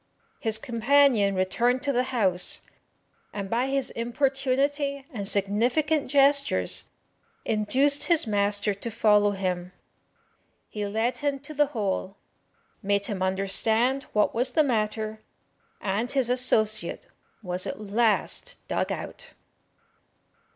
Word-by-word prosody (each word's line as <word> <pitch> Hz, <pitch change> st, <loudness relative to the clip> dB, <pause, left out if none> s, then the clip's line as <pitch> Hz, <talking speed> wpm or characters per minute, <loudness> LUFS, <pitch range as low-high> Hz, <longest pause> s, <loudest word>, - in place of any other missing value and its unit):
His 220 Hz, -2 st, -1 dB
companion 235 Hz, -3 st, +3 dB
returned 240 Hz, +8 st, +1 dB
to 280 Hz, -1 st, 0 dB
the 250 Hz, 0 st, +1 dB
house, 190 Hz, -8 st, 0 dB, 0.7 s
and 195 Hz, -2 st, -6 dB
by 240 Hz, +3 st, +1 dB
his 275 Hz, 0 st, -1 dB
importunity 275 Hz, +3 st, -1 dB
and 200 Hz, -4 st, -4 dB
significant 245 Hz, +10 st, +1 dB
gestures 280 Hz, 0 st, +2 dB, 0.6 s
induced 260 Hz, +7 st, +1 dB
his 335 Hz, -3 st, +3 dB
master 205 Hz, -1 st, +1 dB
to 200 Hz, +4 st, -5 dB
follow 210 Hz, -2 st, +3 dB
him. 185 Hz, -2 st, -3 dB, 1.0 s
He 210 Hz, -1 st, -4 dB
led 220 Hz, +4 st, -1 dB
him 285 Hz, -1 st, -1 dB
to 300 Hz, +2 st, -9 dB
the 295 Hz, 0 st, +3 dB
hole, 200 Hz, -6 st, -3 dB, 0.6 s
made 200 Hz, 0 st, 0 dB
him 200 Hz, -4 st, -4 dB
understand 220 Hz, +7 st, +1 dB
what 210 Hz, -1 st, +2 dB
was 250 Hz, +2 st, -1 dB
the 310 Hz, -, +4 dB
matter, 215 Hz, -3 st, -2 dB, 0.6 s
and 210 Hz, +5 st, -2 dB
his 260 Hz, -3 st, +1 dB
associate 220 Hz, -4 st, +1 dB, 0.4 s
was 180 Hz, -1 st, -3 dB
at -, -, -5 dB
last 225 Hz, -, 0 dB
dug -, -, -1 dB
out. -, -, -7 dB
230 Hz, 115 wpm, -26 LUFS, 205-275 Hz, 1.0 s, the